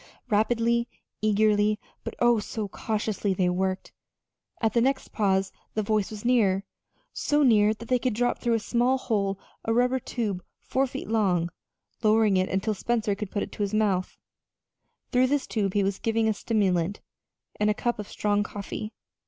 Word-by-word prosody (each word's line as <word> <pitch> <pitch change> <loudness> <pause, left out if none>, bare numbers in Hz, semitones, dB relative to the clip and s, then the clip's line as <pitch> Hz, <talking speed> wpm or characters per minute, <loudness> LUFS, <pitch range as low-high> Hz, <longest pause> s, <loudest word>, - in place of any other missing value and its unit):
Rapidly, 235 +2 +2 0.3
eagerly, 210 0 +3 0.2
but - - -6
oh, 240 -2 +4
so 210 0 -4
cautiously, 210 -1 -2
they 180 -1 +2
worked. 185 +1 -2 0.7
At 220 -2 +1
the 235 - +3
next 265 +2 0
pause 195 -3 +1 0.2
the 215 - +1
voice 210 -1 +1
was 215 +1 -8
nearer, 205 -6 +3 0.5
so 295 0 +1
near 215 -5 +5
that 230 +2 -10
they 250 +1 +2
could 250 -3 -1
drop 245 +2 +1
through 235 -1 +1
a - - +1
small 245 +4 +1
hole 200 -6 -1 0.2
a 225 - -1
rubber 250 +3 +2
tube 210 -7 -3 0.2
four 270 +1 0
feet - - -6
long, 185 -6 +1 0.5
lowering 215 -2 +4
it 185 0 +1
until 195 +3 0
Spencer 220 0 0
could 200 0 -5
put 205 - -3
his 205 0 -2
mouth 200 -4 +2
to - - -26
it. - - -46
Through 255 0 +4
this 280 0 0
tube 200 -4 -1
he 205 - +3
was 195 0 -1
given 225 0 +1
a 220 - +3
stimulant, 200 -4 0 0.6
and 210 0 +3
a 210 - +2
cup 240 0 -1
of 210 - -5
strong 205 -1 +1
coffee. 205 +1 -5
215 Hz, 175 wpm, -26 LUFS, 200-235 Hz, 0.7 s, near